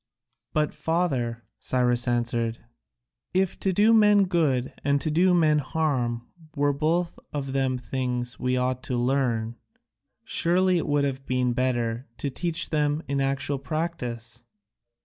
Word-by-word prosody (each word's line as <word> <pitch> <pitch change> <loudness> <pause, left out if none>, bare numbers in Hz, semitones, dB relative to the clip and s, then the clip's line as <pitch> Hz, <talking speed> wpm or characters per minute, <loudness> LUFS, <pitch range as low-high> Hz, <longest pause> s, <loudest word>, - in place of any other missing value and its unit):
"But, 150 -1 0
father," 130 -9 -1 0.2
Cyrus 125 -1 +1
answered, 120 -1 0 0.8
"if 190 -1 +1
to 195 - +1
do 210 +5 +4
men 210 -2 +6
good 150 -8 +1
and 140 0 +2
to 155 - -1
do 180 +4 +4
men 155 -3 +4
harm 130 -6 -1 0.3
were 145 0 +2
both 165 +4 0
of 135 -3 -4
them 135 -1 +1
things 125 0 -3
we 125 0 0
ought 125 0 0
to 125 - -2
learn, 120 -3 0 0.7
surely 180 +1 +2
it - - -3
would 145 -1 +2
have 135 -1 -3
been 125 -1 +1
better 120 -1 -1
to 140 - -3
teach 170 +3 -2
them 150 0 +1
in 140 0 0
actual 135 +1 0
practice?" 125 -6 -4
135 Hz, 140 wpm, -26 LUFS, 125-160 Hz, 0.8 s, men